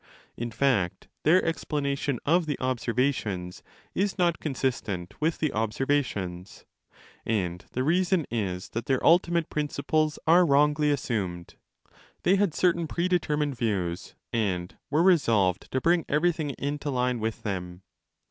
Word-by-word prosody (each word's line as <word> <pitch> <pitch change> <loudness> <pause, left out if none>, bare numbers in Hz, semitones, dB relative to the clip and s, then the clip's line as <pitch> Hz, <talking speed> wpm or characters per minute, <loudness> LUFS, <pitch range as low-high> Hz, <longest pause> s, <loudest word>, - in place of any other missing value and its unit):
In 120 0 -4
fact 115 -6 0
their 175 +5 +4
explanation 140 -5 -1
of 170 +2 +3
the 145 - -2
observations 120 -7 -1 0.3
is 195 +1 0
not 175 -3 +2
consistent 120 - -2
with 160 +1 +1
the 155 -3 -1
observations. 105 -5 -2 0.6
And 90 -5 -2
the 130 - 0
reason 175 +2 +2
is 95 -6 -3
that 115 - -5
their 130 -2 +1
ultimate 170 -1 +3
principles 150 +1 0
are 170 +3 +6
wrongly 150 0 +3
assumed: 100 -11 -2 0.7
they 185 - +4
had 200 -5 +1
certain 170 -2 +2
predetermined 155 -5 0
views, 95 -7 -2 0.2
and 95 -6 -1
were 155 +4 +3
resolved 115 - +3
to 130 - +1
bring 170 +4 +2
everything 155 0 +1
into 145 +1 -3
line 125 -2 0
withthem. 95 -5 -4
140 Hz, 125 wpm, -27 LUFS, 105-160 Hz, 0.7 s, are